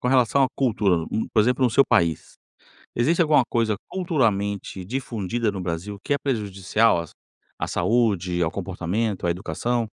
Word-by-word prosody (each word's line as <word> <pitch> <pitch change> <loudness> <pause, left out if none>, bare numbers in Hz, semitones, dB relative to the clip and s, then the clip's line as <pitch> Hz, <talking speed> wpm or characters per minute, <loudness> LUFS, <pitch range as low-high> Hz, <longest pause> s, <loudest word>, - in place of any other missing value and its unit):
Com - - -3
relação 130 +1 +4
à - - +3
cultura, 105 -10 +1 0.3
por 110 - +5
exemplo, 125 +4 +2
no 120 - +3
seu 140 +4 +5
país. 85 -2 +1 0.6
Existe 160 +9 +2
alguma 150 -5 +4
coisa, 115 -2 +1
culturalmente 100 - -1
difundida 115 -1 -2
no 95 - -5
Brasil 90 +4 -4
que - - 0
é 140 - +1
prejudicial 105 -5 +1
às 85 -2 -7 0.5
à - - -2
saúde, 95 -3 +1
ao 85 - +2
comportamento, 95 +2 -2
à - - +2
educação? 115 +6 -1
110 Hz, 155 wpm, -24 LUFS, 95-125 Hz, 0.6 s, por